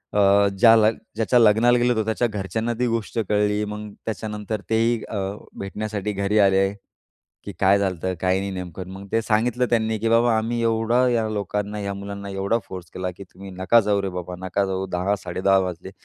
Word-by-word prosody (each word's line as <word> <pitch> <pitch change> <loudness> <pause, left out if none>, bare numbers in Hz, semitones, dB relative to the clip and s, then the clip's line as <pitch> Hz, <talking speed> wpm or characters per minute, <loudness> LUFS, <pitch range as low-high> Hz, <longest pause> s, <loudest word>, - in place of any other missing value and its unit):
अ, 100 0 +5
ज्या-ज्याच्या 115 +1 +3
लग्नाला 115 +2 +5
गेलो 120 0 +2
होतो, 110 -2 0
त्याच्या 110 +2 0
घरच्यांना 110 +2 -3
ती 125 - +2
गोष्ट 115 -1 -3
कळली. 105 0 +1
मग 105 0 -6 0.2
त्याच्यानंतर 105 -1 -4
तेही 115 +1 +2
अ, - - -5 0.4
भेटण्यासाठी 105 +1 -4
घरी 100 +2 0
आले, 95 -1 +4 0.8
की - - -5
"काय 100 +1 +4
झालंय, 95 -2 -1
काही 95 +1 0
नेमकं?" 90 0 -7
मग 100 +1 -9
ते 115 - +2
सांगितलं 120 +3 +1
त्यांनी, 110 -1 +1
की 115 - 0
"बाबा 115 0 +4
आम्ही 115 +2 -1
एवढं 115 +2 +2
या 115 -2 +1
लोकांना, 105 0 -3
या 100 -1 -3
मुलांना 100 0 -7
एवढा 100 +4 0
फोर्स 90 -3 -9
केला 90 0 -3
की 100 - -8
तुम्ही 95 +2 -10
नका 95 +5 +3
जाऊ 100 -1 +1
रे 100 - -2
बाबा, 90 +1 -7
नका 100 +2 0
जाऊ. 95 0 -2
10:00-10.30 95 +1 +1
वाजले 90 +1 -7
105 Hz, 175 wpm, -23 LUFS, 95-115 Hz, 0.8 s, अ